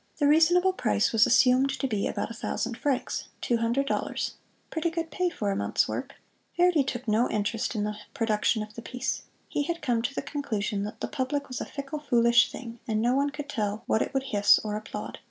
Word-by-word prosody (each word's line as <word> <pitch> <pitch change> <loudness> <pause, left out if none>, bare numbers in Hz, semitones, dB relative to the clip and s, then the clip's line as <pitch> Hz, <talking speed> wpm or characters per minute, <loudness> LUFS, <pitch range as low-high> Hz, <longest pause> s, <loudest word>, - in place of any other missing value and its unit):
The 290 - +2
"reasonable 345 +5 +5
price" 220 - +1
was 225 0 +5
assumed 255 +1 +5
to - - -2
be 210 -5 -1
about - - -3
a - - -5
thousand 230 +1 -3
francs 265 0 -1
two 240 - +1
hundred 235 +4 +1
dollars - - -2 0.4
pretty 325 +1 0
good 330 0 -4
pay 365 -1 0
for 210 -12 -2
a - - -1
month's - - +1
work. - - -4 0.4
Verdi 350 -4 +4
took 255 -2 -4
no 220 +3 +3
interest 215 +3 -1
in 210 - 0
the 210 0 -1 0.2
production 220 0 +1
of 215 0 -11
the 230 - -8
piece. 250 +2 -3 0.3
He - - -1
had 335 +3 -3
come 240 -3 +1
to 275 +4 -3
the - - -2
conclusion 220 -8 -2
that 210 - -8
the - - -1
public 280 +2 -2
was 255 - -5
a - - -2
fickle, 280 +1 -6
foolish 235 -3 +4
thing, 235 -2 -8
and 215 -2 0
no 240 +3 +2
one 280 +2 +2
could 290 0 -7
tell 210 -5 -2
what 220 - +2
it - - -1
would 270 -1 0
hiss 205 -7 +5
or 210 -1 -2
applaud. 215 0 -6
250 Hz, 220 wpm, -27 LUFS, 220-285 Hz, 0.4 s, reasonable